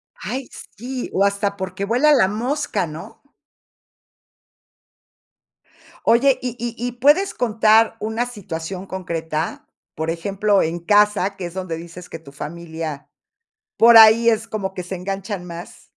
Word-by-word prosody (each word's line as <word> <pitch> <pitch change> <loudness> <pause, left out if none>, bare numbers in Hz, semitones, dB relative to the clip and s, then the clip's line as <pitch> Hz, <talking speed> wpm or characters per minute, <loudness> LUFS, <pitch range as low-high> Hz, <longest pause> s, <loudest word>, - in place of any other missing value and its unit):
Ay 260 0 -5 0.3
sí, 250 +4 -5
o 195 - +2
hasta 200 0 0
porque 190 0 -4
vuela 250 +9 +3
la 250 -10 +4
mosca, 230 - -2
¿no? 155 +1 -10 2.8
Oye, 260 +3 +4
y 250 -2 -4
y 235 0 -4
y, 245 - -3
¿puedes 295 +11 +3
contar 225 -1 +3
una 220 +3 -2
situación 190 -5 -6
concreta? 165 -4 -4 0.3
Por 160 +1 -2
ejemplo, 195 +4 +1
en 165 +2 -2
casa, 205 +1 +2
que 185 - -5
es 175 - -9
donde 185 -3 -4
dices 170 +2 -10
que - - -8
tu 140 -4 -15
familia 160 -1 -7 0.7
por 230 0 +8
ahí 225 +1 +8
es 225 0 0
como 200 -4 -4
que 185 - -5
se 180 +2 -6
enganchan 195 +1 -5
más. 170 0 -10
200 Hz, 140 wpm, -21 LUFS, 175-230 Hz, 2.8 s, por